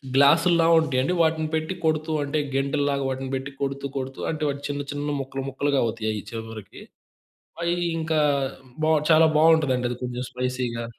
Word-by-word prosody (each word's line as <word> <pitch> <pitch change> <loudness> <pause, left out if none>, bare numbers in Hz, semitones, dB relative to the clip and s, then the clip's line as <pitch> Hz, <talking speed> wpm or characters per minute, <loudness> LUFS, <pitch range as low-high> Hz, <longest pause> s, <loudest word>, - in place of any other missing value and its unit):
గ్లాసుల్లా 165 +4 +5
ఉంటయండి 145 0 0
వాటిని 160 -1 +1
పెట్టి 155 +3 -1
కొడుతూ 155 0 0
అంటే 145 +2 -1 0.2
గెంటేల్లాగా 140 0 0
వాటిని 130 0 -4
పెట్టి 135 +1 -5
కొడుతూ 140 0 -2
కొడుతూ 130 0 -5
అంటే 155 -1 -3
వాటి 140 0 -4
చిన్న 145 0 -3
చిన్న 145 0 -2
ముక్కలు 135 0 -5
ముక్కలుగా 140 +1 0
అవుతయి 110 -1 -2
అయి 105 -1 -4
చివ్వరికి. 110 -2 -8 0.8
అయి 170 0 +1 0.2
ఇంకా 160 -1 0 0.7
బావు 155 0 +4
చాలా 160 0 +7
బావుంటదండి 150 -6 +4
అది 125 - -3
కొంచెం 125 0 -3
స్పైసీగా. 125 -2 -3
140 Hz, 155 wpm, -24 LUFS, 130-155 Hz, 0.8 s, చాలా